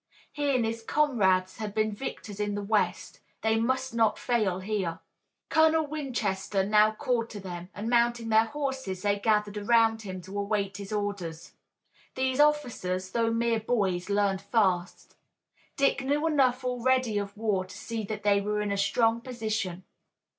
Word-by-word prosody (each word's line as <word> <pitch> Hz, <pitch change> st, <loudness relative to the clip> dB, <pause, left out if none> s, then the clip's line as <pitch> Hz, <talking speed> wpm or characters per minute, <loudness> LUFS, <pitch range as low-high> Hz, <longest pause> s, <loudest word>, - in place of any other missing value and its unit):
He 290 Hz, -2 st, 0 dB
and 240 Hz, -3 st, +2 dB
his 225 Hz, +1 st, -3 dB
comrades 205 Hz, -10 st, +2 dB
had 210 Hz, -2 st, -5 dB
been 215 Hz, 0 st, +1 dB
victors 210 Hz, -2 st, -6 dB
in 205 Hz, 0 st, -1 dB
the 205 Hz, -, -3 dB
west. 210 Hz, +1 st, -1 dB, 0.2 s
They 220 Hz, 0 st, +2 dB
must 260 Hz, +2 st, 0 dB
not 225 Hz, -2 st, +2 dB
fail 215 Hz, -7 st, 0 dB
here. 190 Hz, -4 st, -2 dB, 0.5 s
Colonel 315 Hz, 0 st, +4 dB
Winchester 220 Hz, -10 st, -2 dB
now 210 Hz, +1 st, +5 dB
called 230 Hz, +1 st, -1 dB
to 205 Hz, -, -7 dB
them, 180 Hz, -2 st, -7 dB
and 210 Hz, +2 st, -4 dB
mounting 235 Hz, -1 st, +2 dB
their 220 Hz, 0 st, +5 dB
horses 265 Hz, -8 st, -4 dB
they 205 Hz, 0 st, +1 dB
gathered 210 Hz, -1 st, +1 dB
around 225 Hz, +1 st, +3 dB
him 190 Hz, -3 st, -6 dB
to 190 Hz, +3 st, -6 dB
await 200 Hz, -1 st, -1 dB
his 200 Hz, 0 st, -8 dB
orders. 200 Hz, -6 st, -4 dB, 0.6 s
These 260 Hz, +1 st, 0 dB
officers, 235 Hz, -12 st, +1 dB
though 230 Hz, +1 st, +1 dB
mere 230 Hz, 0 st, +1 dB
boys, 200 Hz, -6 st, -1 dB
learned 200 Hz, -1 st, +1 dB
fast. 190 Hz, -5 st, 0 dB, 0.6 s
Dick 275 Hz, 0 st, +2 dB
knew 290 Hz, +3 st, 0 dB
enough 265 Hz, -5 st, +2 dB
already 250 Hz, -3 st, +1 dB
of 200 Hz, 0 st, -6 dB
war 210 Hz, -4 st, 0 dB
to 190 Hz, +2 st, -11 dB
see 225 Hz, 0 st, -4 dB
that 210 Hz, +1 st, -5 dB
they 200 Hz, -1 st, +3 dB
were 210 Hz, +1 st, -1 dB
in 210 Hz, -1 st, -1 dB
a 200 Hz, -, 0 dB
strong 225 Hz, +3 st, +2 dB
position. 220 Hz, -7 st, -3 dB
215 Hz, 160 wpm, -28 LUFS, 200-240 Hz, 0.6 s, now